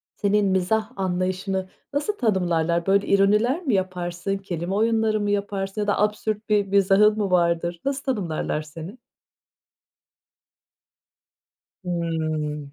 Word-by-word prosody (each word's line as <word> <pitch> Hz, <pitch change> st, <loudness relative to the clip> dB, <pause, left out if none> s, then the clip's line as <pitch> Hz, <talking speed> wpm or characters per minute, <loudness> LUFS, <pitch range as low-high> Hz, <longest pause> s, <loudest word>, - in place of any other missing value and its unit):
senin 205 Hz, 0 st, +2 dB
mizah 195 Hz, +4 st, +1 dB
anlayışını 185 Hz, 0 st, -2 dB, 0.2 s
nasıl 355 Hz, +9 st, -1 dB
tanımlarlar? 170 Hz, -6 st, +1 dB
Böyle 200 Hz, +1 st, +2 dB
ironiler 210 Hz, -, +3 dB
mi 270 Hz, -8 st, 0 dB
yaparsın, 185 Hz, 0 st, -2 dB
kelime 180 Hz, -1 st, -4 dB
oyunları 220 Hz, 0 st, +2 dB
mı 205 Hz, 0 st, -1 dB
yaparsın 200 Hz, 0 st, -2 dB
ya 205 Hz, -, -2 dB
da 205 Hz, -, +1 dB
absürt 210 Hz, +1 st, -1 dB
bir 205 Hz, -1 st, +3 dB
mizahın 200 Hz, +2 st, +4 dB
mı 200 Hz, -3 st, -1 dB
vardır, 170 Hz, -1 st, +1 dB
nasıl 275 Hz, 0 st, -1 dB
tanımlarlar 180 Hz, -, -2 dB
seni? 160 Hz, +7 st, -9 dB, 2.9 s
Hımm. 155 Hz, -4 st, -2 dB
195 Hz, 115 wpm, -24 LUFS, 175-210 Hz, 2.9 s, mizahın